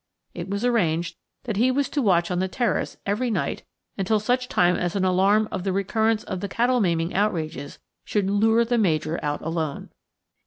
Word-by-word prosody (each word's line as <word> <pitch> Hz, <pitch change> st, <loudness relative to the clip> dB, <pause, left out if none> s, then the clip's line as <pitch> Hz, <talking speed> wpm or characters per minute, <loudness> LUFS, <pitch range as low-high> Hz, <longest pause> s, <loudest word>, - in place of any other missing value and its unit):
It 175 Hz, +2 st, -6 dB
was 200 Hz, +4 st, -2 dB
arranged 175 Hz, -9 st, +1 dB, 0.3 s
that 220 Hz, -5 st, -3 dB
he 245 Hz, +4 st, +3 dB
was 275 Hz, +2 st, +1 dB
to 290 Hz, -, -1 dB
watch 180 Hz, -6 st, +2 dB
on 180 Hz, -, 0 dB
the 190 Hz, -, 0 dB
terrace 230 Hz, +1 st, -1 dB
every 215 Hz, +5 st, 0 dB
night 220 Hz, -, -2 dB, 0.4 s
until 210 Hz, +3 st, +2 dB
such 250 Hz, +4 st, 0 dB
time 180 Hz, 0 st, +3 dB
as 175 Hz, +1 st, -2 dB
an 190 Hz, -1 st, +1 dB
alarm 195 Hz, +4 st, +3 dB
of 190 Hz, -3 st, -3 dB
the 195 Hz, -, 0 dB
recurrence 220 Hz, +3 st, +1 dB
of 190 Hz, -5 st, -5 dB
the 200 Hz, -, -4 dB
cattle 245 Hz, +3 st, +2 dB
maiming 170 Hz, -2 st, 0 dB
outrages 160 Hz, -8 st, -2 dB, 0.3 s
should 205 Hz, -2 st, -1 dB
lure 225 Hz, +3 st, +3 dB
the 240 Hz, 0 st, +1 dB
Major 160 Hz, -4 st, 0 dB
out 145 Hz, 0 st, -2 dB
alone. 160 Hz, -3 st, -3 dB
195 Hz, 190 wpm, -24 LUFS, 175-225 Hz, 0.4 s, he